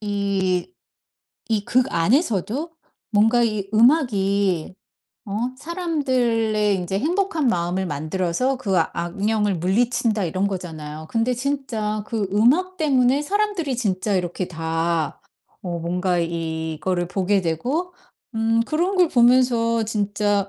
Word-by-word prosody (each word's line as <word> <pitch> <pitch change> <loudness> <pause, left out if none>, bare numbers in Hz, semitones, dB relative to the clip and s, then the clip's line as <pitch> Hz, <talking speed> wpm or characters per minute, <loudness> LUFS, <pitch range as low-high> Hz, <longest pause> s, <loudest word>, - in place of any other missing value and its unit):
이 200 - -1 0.8
이 210 -2 +1
극 255 +1 +2
안에서도 235 - +1 0.4
뭔가 225 +3 +4
이 215 -4 -1
음악이 200 - +2 0.5
어 205 - -10 0.3
사람들의 250 - 0
인제 185 +1 -2
행복한 335 - 0
마음을 180 -1 0
만들어서 175 - -1
그 195 -7 -1
악령을 200 +5 0
물리친다 215 +3 +1
이런 185 +4 0
거잖아요. 155 -5 -6
근데 235 +2 +1
진짜 235 -6 -2
그 215 -4 -2
음악 300 - +3
때문에 270 -3 +2
사람들이 380 -6 -1
진짜 205 -3 -1
이렇게 180 0 -2
다 165 -1 -2 0.4
어 175 -2 -4
뭔가 180 +1 0
이거를 165 +1 -2
보게 195 +1 +1
되고 255 - -2 0.4
음 225 +1 +2
그런 340 +8 0
걸 360 -3 +4
보면서 240 -3 +3
진짜 205 -2 0
210 Hz, 245 characters per minute, -22 LUFS, 180-250 Hz, 0.8 s, 뭔가